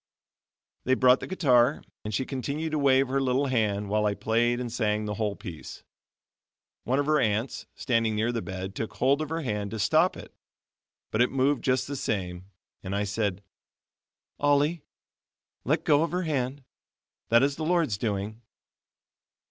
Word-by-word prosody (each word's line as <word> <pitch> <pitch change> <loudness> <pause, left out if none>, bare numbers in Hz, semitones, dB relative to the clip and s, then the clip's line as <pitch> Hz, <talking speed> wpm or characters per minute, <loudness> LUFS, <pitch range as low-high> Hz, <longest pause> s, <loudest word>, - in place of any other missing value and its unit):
They 130 - +3
brought 130 0 +5
the - - -6
guitar, 135 -7 +3 0.2
and 105 - -4
she 120 +5 -1
continued 140 +5 -3
to 155 - 0
wave 135 -1 +4
her 135 +1 +1
little 130 +1 +1
hand, 105 -6 0
while 105 +1 +1
I 100 - 0
played 115 +4 +1
and 120 -2 -4
sang 105 -2 0
the 105 - -3
whole 105 -1 -2
piece. 85 -7 -9 1.0
One 130 +3 +1
of 145 - +1
her 155 0 +3
aunts, 110 +2 -1
standing 115 -4 0
near 110 +3 +1
the 115 -2 -2
bed 95 -1 -6
took 110 +2 -4
hold 140 +4 +2
of 155 - -3
her 165 +1 -2
hand 105 -7 -2
to 110 - -5
stop 160 - +3
it, - - -11 0.8
but 110 - +1
it 125 - +4
moved 135 0 +1
just 130 0 +1
the 140 - -4
same; 95 -7 -3 0.4
and 95 0 -4
I 100 - 0
said: 100 -1 -2 1.0
"Ollie, 145 +3 +2 0.8
let - - +1
go 145 0 +4
of 165 - +1
her 180 +1 0
hand, 140 -3 -2 0.7
that 115 +2 +5
is 140 0 +1
the 155 - -5
Lord's 160 - +1
doings." 105 0 -3
120 Hz, 170 wpm, -27 LUFS, 105-140 Hz, 1.0 s, brought